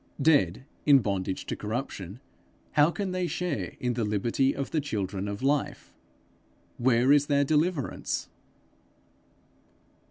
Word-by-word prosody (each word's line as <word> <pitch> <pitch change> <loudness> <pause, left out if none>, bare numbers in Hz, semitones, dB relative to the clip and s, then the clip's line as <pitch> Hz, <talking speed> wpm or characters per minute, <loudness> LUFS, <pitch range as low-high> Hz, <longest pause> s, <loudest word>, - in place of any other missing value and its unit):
Dead, 135 - +3 0.2
in 145 -2 +7
bondage 100 -5 -2
to - - -3
corruption, 105 -3 -5 0.5
how 150 +1 +5
can 195 +1 -3
they 185 -1 -1
share 150 - -3
in 125 -1 -1
the 115 -1 -1
liberty 115 +6 +1
of 140 - -4
the 155 - +1
children 100 -7 -3
of 100 +4 -5
Life? 140 +1 -1 0.9
Where 125 +1 +3
is 145 0 +5
their 140 -1 +3
deliverance? 155 0 -1
130 Hz, 125 wpm, -28 LUFS, 105-145 Hz, 0.9 s, in